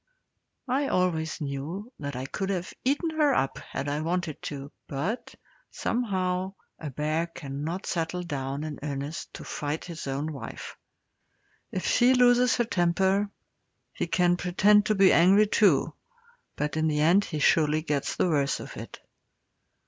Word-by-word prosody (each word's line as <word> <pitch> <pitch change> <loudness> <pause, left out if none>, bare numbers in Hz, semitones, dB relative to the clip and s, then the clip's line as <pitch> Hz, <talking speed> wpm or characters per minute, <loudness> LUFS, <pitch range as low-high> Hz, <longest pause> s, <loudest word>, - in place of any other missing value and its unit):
I 270 +3 +1
always 165 -6 0
knew 155 - -5
that 140 -2 -5
I 130 +1 -4
could 195 +8 -3
have 185 -1 -3
eaten 290 +6 +1
her 300 -4 +3
up 135 - 0
had 140 - -5
I 145 +1 -1
wanted 170 -1 -2
to, 140 -1 -6 0.2
but, 165 - -3 0.3
somehow, 190 -5 -1 0.2
a 155 - -5
bear 155 +4 -1
cannot 155 +3 -5
settle 175 +1 -2
down 140 -3 -3
in 155 -3 -5
earnest 145 +2 -5
to - - -8
fight 150 +2 -4
his 165 -4 -7
own 140 +3 -2
wife. 125 -5 -8 1.0
If 185 - -3
she 250 +2 +4
loses 245 0 +5
her 240 - +1
temper, 190 +1 +2 0.6
he - - -2
can 175 +1 +2
pretend 195 +3 +4
to 215 - +2
be 195 -1 +6
angry 195 +5 +6
too, 210 0 +3 0.6
but 150 +1 -2
in 160 0 +2
the 150 -1 +1
end 175 +6 +5
he 155 - -4
surely 155 +1 +3
gets 145 -3 -1
the - - +2
worst 145 -4 +1
of - - -8
it. - - -8
170 Hz, 155 wpm, -27 LUFS, 150-195 Hz, 1.0 s, be